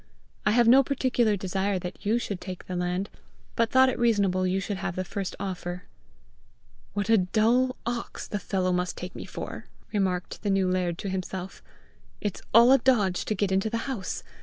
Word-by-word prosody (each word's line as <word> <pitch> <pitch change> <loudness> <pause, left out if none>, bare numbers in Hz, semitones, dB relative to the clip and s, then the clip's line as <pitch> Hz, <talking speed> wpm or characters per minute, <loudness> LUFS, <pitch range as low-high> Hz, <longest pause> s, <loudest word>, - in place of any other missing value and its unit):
"I - - +5
have 240 0 +4
no 260 +3 +8
particular 245 -5 +1
desire 190 +1 -1 0.2
you 215 +3 +1
should 200 -6 -4
take 185 -2 -7
the 185 - -5
land, 180 +2 -1 0.5
but 230 0 +2
thought 260 0 +6
it 260 - -1
reasonable 200 -6 +2
you 185 +1 +1
should 200 0 -3
have 190 -2 -3
the 185 - -1
first 195 +1 -4
offer." 180 -2 -4 1.1
"What 205 -1 -1
a 225 -2 +5
dull 230 +7 +2
ox 240 0 -4
the 205 - -3
fellow 185 -1 0
must 180 -1 -1
take 180 +1 -6
me - - -6
for!" - - -7 0.3
remarked 185 -3 -1
the 205 - -1
new 195 -1 +2
laird 180 -2 0
to - - -1
himself. 190 0 -5 0.6
"It's 205 -3 -3
all 235 +3 +7
a 270 - +7
dodge 210 -8 +2
to 215 - -1
get 195 0 0
into 195 +3 +1
the 230 0 -2
house! 235 -9 -4
195 Hz, 185 wpm, -27 LUFS, 185-230 Hz, 1.1 s, no